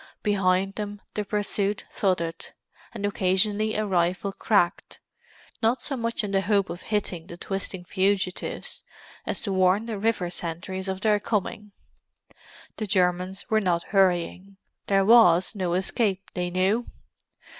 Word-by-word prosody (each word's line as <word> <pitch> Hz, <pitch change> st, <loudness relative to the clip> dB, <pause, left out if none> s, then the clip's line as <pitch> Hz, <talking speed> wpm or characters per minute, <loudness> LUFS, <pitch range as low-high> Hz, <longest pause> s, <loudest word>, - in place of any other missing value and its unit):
Behind 195 Hz, -1 st, +2 dB
them 205 Hz, 0 st, -5 dB
the 210 Hz, -, -1 dB
pursuit 205 Hz, 0 st, -1 dB
thudded, 170 Hz, -4 st, -1 dB, 0.4 s
and 215 Hz, -4 st, -4 dB
occasionally 205 Hz, +2 st, +1 dB
a 215 Hz, -, 0 dB
rifle 185 Hz, +1 st, 0 dB
cracked; 190 Hz, -5 st, 0 dB, 0.6 s
not 230 Hz, +3 st, +2 dB
so 275 Hz, -, -2 dB
much 230 Hz, -2 st, -2 dB
in 205 Hz, -, -3 dB
the 195 Hz, -1 st, +2 dB
hope 200 Hz, -1 st, +1 dB
of 175 Hz, -, -7 dB
hitting 190 Hz, -6 st, -3 dB
the 170 Hz, -, -9 dB
twisting 190 Hz, -1 st, -4 dB
fugitives, 190 Hz, 0 st, -1 dB, 0.5 s
as -, -, -1 dB
to 200 Hz, -, -2 dB
warn 190 Hz, +3 st, +3 dB
the 220 Hz, -3 st, -4 dB
river 200 Hz, -5 st, 0 dB
sentries 175 Hz, +3 st, -5 dB
of 190 Hz, 0 st, -3 dB
their 210 Hz, -1 st, +3 dB
coming. 210 Hz, 0 st, -2 dB, 1.1 s
The 215 Hz, -, -3 dB
Germans 185 Hz, 0 st, 0 dB
were 220 Hz, 0 st, +4 dB
not 175 Hz, -3 st, +1 dB
hurrying; 190 Hz, 0 st, +1 dB, 0.3 s
there 195 Hz, -1 st, +3 dB
was 195 Hz, -6 st, +6 dB
no 185 Hz, -4 st, -1 dB
escape, 195 Hz, +1 st, 0 dB
they 180 Hz, 0 st, -2 dB
knew! 190 Hz, +6 st, +1 dB
195 Hz, 140 wpm, -26 LUFS, 185-210 Hz, 1.1 s, was